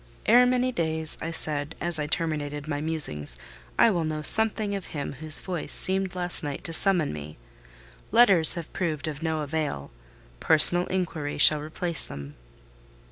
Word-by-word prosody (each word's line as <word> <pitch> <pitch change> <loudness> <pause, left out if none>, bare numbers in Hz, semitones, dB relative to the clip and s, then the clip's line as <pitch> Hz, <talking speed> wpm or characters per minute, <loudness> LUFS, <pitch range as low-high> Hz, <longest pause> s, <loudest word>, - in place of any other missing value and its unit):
"Ere 245 +2 +4
many 255 0 -1
days," 160 -5 -2
I 165 - -5
said, 150 -2 -5
as 170 -2 +2
I 150 - -4
terminated 150 -2 -5
my 145 -1 -4
musings, 75 - -1 0.4
"I 230 - +4
will 175 -4 -2
know 155 -1 -5
something 220 +3 +6
of 195 -2 -7
him 140 - -6
whose 155 +2 +2
voice 180 -3 -6
seemed 190 -1 +1
last 175 -1 -3
night 145 -2 -7
to 165 - -5
summon 180 - +2
me. 75 0 -10 0.7
Letters 195 -8 +4
have 170 -2 -9
proved 160 -6 -4
of 150 0 -7
no 160 -1 -3
avail—personal 140 - +1
inquiry 165 -6 -5
shall 150 +1 +4
replace 160 +2 -2
them." 70 0 -10
160 Hz, 155 wpm, -24 LUFS, 145-180 Hz, 0.7 s, something